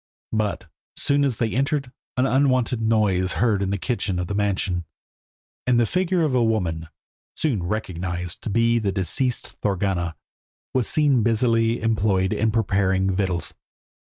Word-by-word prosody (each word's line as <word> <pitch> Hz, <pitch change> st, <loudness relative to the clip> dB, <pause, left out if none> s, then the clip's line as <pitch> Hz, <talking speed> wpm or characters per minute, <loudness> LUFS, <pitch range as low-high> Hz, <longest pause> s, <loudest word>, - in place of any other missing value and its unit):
But, 110 Hz, -2 st, -1 dB
so -, -, -23 dB, 0.4 s
soon 145 Hz, 0 st, +3 dB
as 130 Hz, -5 st, 0 dB
they 115 Hz, -2 st, 0 dB
entered, 140 Hz, 0 st, 0 dB, 0.3 s
an 125 Hz, -, +3 dB
unwonted 130 Hz, -3 st, +2 dB
noise 110 Hz, -4 st, +2 dB
was 95 Hz, -, -1 dB
heard 110 Hz, -5 st, +1 dB
in 95 Hz, -, 0 dB
the 100 Hz, -, 0 dB
kitchen 100 Hz, -3 st, -2 dB
of 90 Hz, -, -1 dB
the 100 Hz, -, -4 dB
mansion, 100 Hz, -4 st, 0 dB, 0.8 s
and 125 Hz, -1 st, +4 dB
the 120 Hz, -, +4 dB
figure 180 Hz, -, +1 dB
of 150 Hz, -4 st, +1 dB
a 125 Hz, -2 st, +3 dB
woman, 85 Hz, -8 st, 0 dB, 0.5 s
soon 130 Hz, -, 0 dB
recognised 90 Hz, -2 st, -4 dB
to -, -, -4 dB
be 115 Hz, +2 st, +3 dB
the 100 Hz, -3 st, 0 dB
deceased 100 Hz, -, -2 dB
Thorgunna, 95 Hz, -4 st, -1 dB, 0.6 s
was 130 Hz, -3 st, +1 dB
seen 145 Hz, -5 st, +3 dB
busily 115 Hz, 0 st, +2 dB
employed 100 Hz, -4 st, +1 dB
in 110 Hz, -, +1 dB
preparing 95 Hz, -3 st, +1 dB
victuals. 95 Hz, -3 st, -1 dB
110 Hz, 155 wpm, -23 LUFS, 95-125 Hz, 0.8 s, and